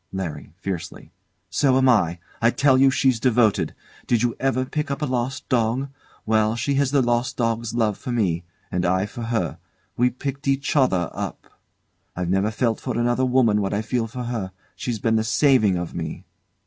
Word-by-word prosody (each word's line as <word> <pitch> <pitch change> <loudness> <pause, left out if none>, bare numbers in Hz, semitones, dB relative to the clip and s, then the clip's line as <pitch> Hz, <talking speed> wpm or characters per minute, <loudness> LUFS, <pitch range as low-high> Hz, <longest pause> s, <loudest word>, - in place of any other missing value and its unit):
LARRY. 90 -7 -5
[Fiercely] 95 -2 -6 0.4
So 130 -2 +3
am 130 0 +4
I. 90 -9 +3 0.2
I 115 - +5
tell 135 +2 +3
you 135 +1 +6
she's 130 -2 +2
devoted. 115 -3 +2 0.3
Did 120 -1 +2
you 120 -1 +1
ever 130 -1 +1
pick 150 +2 -3
up 140 +2 -3
a - - +3
lost 130 0 -2
dog? 125 +3 +1 0.4
Well, 110 0 +2
she 140 +4 -1
has 140 -1 +2
the 140 -1 +3
lost 120 0 0
dog's 115 -1 -1
love 110 -4 +1
for 125 - -5
me. 95 -8 0 0.3
And 90 - -1
I 95 +2 +2
for 120 - -8
her; 90 -8 -2 0.4
we 125 +1 +3
picked 135 +2 -5
each 135 +2 0
other 95 - +2
up. - - -6 0.6
I've 90 0 -2
never 95 +2 +2
felt 110 +1 0
for - - -3
another 120 +2 +1
woman 120 -5 +3
what 100 0 -1
I 105 - -1
feel 115 +1 -1
for 125 +2 -6
her 115 -6 -3 0.2
she's 120 -3 -3
been 110 +2 +1
the 110 - +1
saving 110 -3 +3
of 85 -1 -4
me! 80 -2 -5
120 Hz, 190 wpm, -23 LUFS, 105-130 Hz, 0.6 s, you